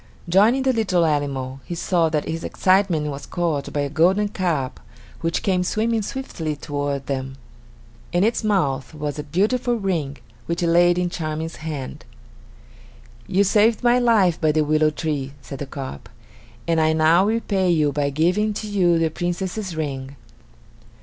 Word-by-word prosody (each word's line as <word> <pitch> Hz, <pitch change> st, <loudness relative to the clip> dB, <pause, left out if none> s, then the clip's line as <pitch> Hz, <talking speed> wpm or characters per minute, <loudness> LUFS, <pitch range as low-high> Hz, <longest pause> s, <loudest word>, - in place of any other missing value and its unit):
Joining 215 Hz, +9 st, +4 dB
the 265 Hz, -1 st, +2 dB
little 190 Hz, -7 st, +2 dB
animal, 135 Hz, -3 st, -1 dB
he 175 Hz, -, -6 dB
saw 170 Hz, -1 st, +1 dB
that 155 Hz, -1 st, -1 dB
his 165 Hz, +1 st, -4 dB
excitement 185 Hz, -5 st, +2 dB
was 140 Hz, 0 st, -8 dB
caused 165 Hz, -5 st, -2 dB
by 145 Hz, -, -1 dB
a 140 Hz, -, -2 dB
golden 190 Hz, +7 st, +3 dB
carp 165 Hz, -10 st, -2 dB, 0.4 s
which 165 Hz, 0 st, -1 dB
came 185 Hz, -2 st, +1 dB
swimming 220 Hz, +4 st, 0 dB
swiftly 195 Hz, -, -4 dB
toward 145 Hz, -1 st, -3 dB
them. 135 Hz, 0 st, -4 dB, 0.7 s
In 175 Hz, +2 st, +2 dB
its 225 Hz, +2 st, +1 dB
mouth 155 Hz, -10 st, 0 dB
was 150 Hz, 0 st, -4 dB
a -, -, -3 dB
beautiful 240 Hz, +9 st, 0 dB
ring 170 Hz, -10 st, -2 dB, 0.3 s
which 170 Hz, +1 st, -1 dB
it 170 Hz, -, +2 dB
laid 175 Hz, +1 st, +4 dB
in 180 Hz, -1 st, 0 dB
Charming's 160 Hz, 0 st, -4 dB
hand. 150 Hz, -4 st, -6 dB, 1.2 s
"You 195 Hz, +2 st, +3 dB
saved 215 Hz, +4 st, +3 dB
my 245 Hz, +1 st, +4 dB
life 210 Hz, -9 st, +3 dB
by 155 Hz, -1 st, +3 dB
the 155 Hz, 0 st, +2 dB
willow 155 Hz, +1 st, +3 dB
tree," 150 Hz, -3 st, -3 dB
said 135 Hz, -1 st, -9 dB
the 145 Hz, -, -5 dB
carp, 135 Hz, -, -7 dB, 0.6 s
"and 165 Hz, -1 st, +2 dB
I 155 Hz, 0 st, +3 dB
now 160 Hz, +3 st, +4 dB
repay 205 Hz, -4 st, 0 dB
you 155 Hz, -4 st, +3 dB
by 145 Hz, 0 st, 0 dB
giving 180 Hz, +9 st, +1 dB
to 215 Hz, -, -4 dB
you 180 Hz, -5 st, +2 dB
the 165 Hz, -1 st, +1 dB
Princess's 175 Hz, +2 st, -3 dB
ring." 140 Hz, -3 st, -4 dB
165 Hz, 165 wpm, -22 LUFS, 150-195 Hz, 1.2 s, Joining